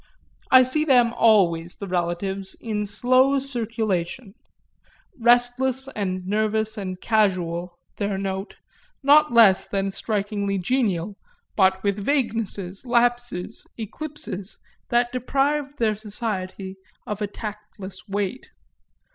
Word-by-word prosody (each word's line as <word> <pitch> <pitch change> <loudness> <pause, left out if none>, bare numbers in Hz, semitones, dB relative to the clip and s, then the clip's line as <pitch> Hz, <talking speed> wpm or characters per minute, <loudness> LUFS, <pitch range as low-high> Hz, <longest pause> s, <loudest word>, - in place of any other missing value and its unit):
I 255 0 +8
see 260 +5 +1
them 245 -5 +4
always, 175 -8 +3
the 200 - -7
relatives, 185 +2 -2
in 210 -2 -3
slow 255 +6 +3
circulation; 225 -5 -2 0.9
restless 245 +2 +3
and 185 -6 -3
nervous 215 +2 0
and 185 -3 -5
casual 180 -6 0 0.2
their 200 -2 -1
note, 195 +1 -4 0.5
not 300 +1 +6
less 225 -5 +6
than 195 -1 -1
strikingly 200 -1 -2
genial, 200 -3 -1 0.4
but 190 -1 +3
with 200 0 -1
vaguenesses, 220 -8 -2
lapses, 240 -5 0
eclipses, 225 -4 -6 0.3
that 240 0 +2
deprived 280 +3 -1
their 225 -4 +2
society 200 -3 -5 0.3
of 210 0 -5
a 210 - 0
tactless 210 -1 -8
weight. 205 +5 -3
210 Hz, 105 wpm, -24 LUFS, 190-245 Hz, 0.9 s, I